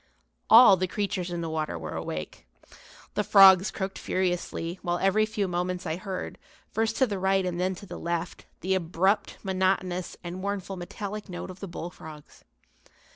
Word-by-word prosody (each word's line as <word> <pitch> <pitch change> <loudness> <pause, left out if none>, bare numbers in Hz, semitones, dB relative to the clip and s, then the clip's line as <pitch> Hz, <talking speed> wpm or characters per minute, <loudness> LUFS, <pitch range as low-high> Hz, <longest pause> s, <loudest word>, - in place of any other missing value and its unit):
All 225 -4 +9
the 185 +1 0
creatures 185 -2 -2
in 175 -1 -3
the 165 - -3
water 155 - -2
were 80 -2 -6
awake. 75 -5 -6 0.7
The 210 - 0
frogs 195 -1 +7
croaked 190 0 -4
furiously, 180 -1 -2
while 175 -1 -1
every 200 +4 +2
few 215 -3 -1
moments 180 0 -2
I 160 0 -2
heard, 190 0 -6 0.3
first 225 +1 0
to 260 - +4
the 205 -5 -3
right 190 0 +2
and 175 -1 -2
then 185 +1 0
to 200 - -11
the - - -8
left, 170 +1 -4
the 190 +1 0
abrupt, 185 +3 +1
monotonous 185 -2 -1
and 175 +1 -6
mournful 195 -1 -3
metallic 200 +3 -6
note 180 +1 -6
of 185 - -13
the 195 - -6
bullfrogs. 160 -3 -9
185 Hz, 170 wpm, -27 LUFS, 175-195 Hz, 0.7 s, All